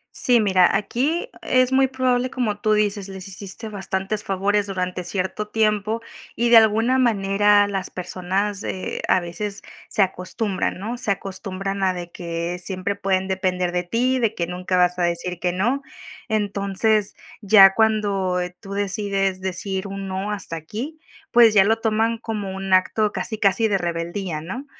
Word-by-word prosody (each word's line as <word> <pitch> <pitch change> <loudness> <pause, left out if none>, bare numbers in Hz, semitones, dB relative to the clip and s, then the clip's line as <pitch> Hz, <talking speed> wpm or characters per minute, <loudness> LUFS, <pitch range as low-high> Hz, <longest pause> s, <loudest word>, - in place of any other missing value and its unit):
Sí, 245 -3 +4
mira, 190 -2 +4
aquí 280 - -1
es 255 0 +2
muy 265 0 +4
probable, 255 -1 +1
como 235 -6 -2
tú 215 0 +2
dices. 205 -2 0
Les 190 -1 -8
hiciste 200 +3 -7
bastantes 195 +1 -3
favores 200 +2 0
durante 185 -2 -3
cierto 190 +3 -3
tiempo, 215 +1 0 0.3
y 235 +1 +1
de 235 - +10
alguna 225 +4 +3
manera, 205 -3 +3
las 195 -2 -3
personas, 190 +3 -3
eh 185 - -4
a 185 - +4
veces 190 +4 -5 0.3
se 210 - +2
acostumbran, 190 +2 -2
¿no? 225 +6 -4
Se 220 - -2
acostumbran 195 0 -5
a 185 -1 +2
de 175 -1 -7
que 170 0 -4
siempre 185 +2 -2
pueden 190 -1 0
depender 185 -2 -1
de 180 0 -1
ti, 250 +8 +1
de 225 -2 +1
que 170 - -2
nunca 180 +1 -2
vas 180 0 +3
a - - +1
decir 175 +1 -2
que 180 -1 0
no. 235 +10 0 0.5
Entonces, 205 0 0 0.3
ya 195 -2 +7
cuando, 205 -4 +1
eh, 180 0 -4
tú 195 0 -8
decides 195 -1 -1
decir 190 +1 -3
un 195 0 -6
no, 190 +2 -3
hasta 195 -5 -4
aquí, 235 - -6 0.3
pues 235 -2 +6
ya 195 -2 +7
lo 225 +2 +2
toman 225 +1 +1
como 210 -4 -4
un 190 0 0
acto 205 +3 +2
casi 220 - -4
casi 205 +2 +3
de 200 -3 +1
rebeldía, 170 -1 -3
¿no? 250 - -6
195 Hz, 165 wpm, -22 LUFS, 185-220 Hz, 0.5 s, de